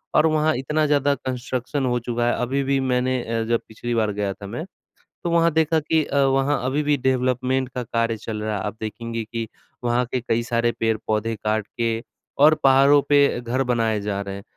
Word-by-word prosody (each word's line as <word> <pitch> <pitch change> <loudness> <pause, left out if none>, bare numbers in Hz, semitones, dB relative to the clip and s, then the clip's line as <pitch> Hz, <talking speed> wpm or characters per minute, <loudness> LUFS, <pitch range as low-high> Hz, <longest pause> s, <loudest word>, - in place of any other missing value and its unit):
और 155 - +5
वहाँ 155 0 +2
इतना 150 +4 0
ज़्यादा 145 -1 +3
कंस्ट्रक्शन 130 +1 -3
हो 125 -1 +1
चुका 120 0 -2
है, - - +2
अभी 135 +3 0
भी 135 0 +1
मैंने 130 -1 0
अ, 115 -1 -2
जब 115 -1 +2
पिछली 120 +2 -5
बार 110 -2 +1
गया 100 -1 -2
था 100 0 -10
मैं, 120 - -5 0.6
तो 170 - 0
वहाँ 170 0 +3
देखा 160 0 +2
कि 155 +1 +1
अ, 140 - -1
वहाँ 135 +1 +2
अभी 140 +3 0
भी 150 0 +2
डेवलपमेंट 130 0 0
का 125 - -2
कार्य 115 0 -1
चल 110 0 -5
रहा 110 -1 -2
है। - - -4
आप 105 +1 -4
देखेंगे 115 +1 -4
कि 115 0 -5 0.4
वहाँ 120 +1 +2
के 130 - 0
कई 115 -1 0
सारे 120 0 0
पेड़-पौधे 110 0 0
काट 105 0 -1
के 115 0 -2 0.4
और 155 +1 +8
पहाड़ों 135 +2 +6
पे 145 -3 +4
घर 125 +2 -1
बनाए 115 -3 +1
जा 100 -1 -2
रहे 100 -1 -6
हैं। 100 - -9
125 Hz, 205 wpm, -23 LUFS, 115-140 Hz, 0.6 s, और